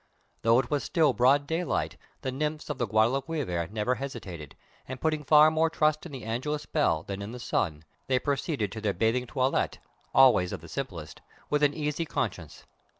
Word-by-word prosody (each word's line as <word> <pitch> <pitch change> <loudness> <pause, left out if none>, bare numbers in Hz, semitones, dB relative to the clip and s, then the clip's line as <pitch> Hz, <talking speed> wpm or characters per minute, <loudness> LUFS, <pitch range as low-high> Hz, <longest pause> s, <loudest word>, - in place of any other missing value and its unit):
Though 115 +1 +4
it 130 - 0
was 145 -1 +1
still 155 -5 +2
broad 130 +5 +4
daylight, 165 +3 -1 0.3
the 130 - -1
nymphs 150 +3 -3
of 140 - -6
the 120 - 0
Guadalquivir 115 - 0
never 110 +4 0
hesitated, 95 - -7 0.3
and 130 0 -6
putting 155 0 0
far 150 +2 +7
more 160 +1 +2
trust 155 0 +1
in - - -13
the 135 -4 -7
Angelus 140 +7 -3
bell 115 - +1
than 100 +2 -5
in 100 +3 -6
the 125 - -7
sun, 80 -9 -1 0.2
they 130 - +2
proceeded 135 - -1
to 110 - -6
their 105 -2 0
bathing 120 +4 +1
toilette 130 +1 0 0.3
always 120 -9 +5
of 95 - -5
the 85 - -11
simplest 90 - -6 0.3
with 150 0 +2
an 145 -1 +3
easy 150 +1 -2
conscience. 90 - -4
130 Hz, 185 wpm, -28 LUFS, 110-150 Hz, 0.3 s, far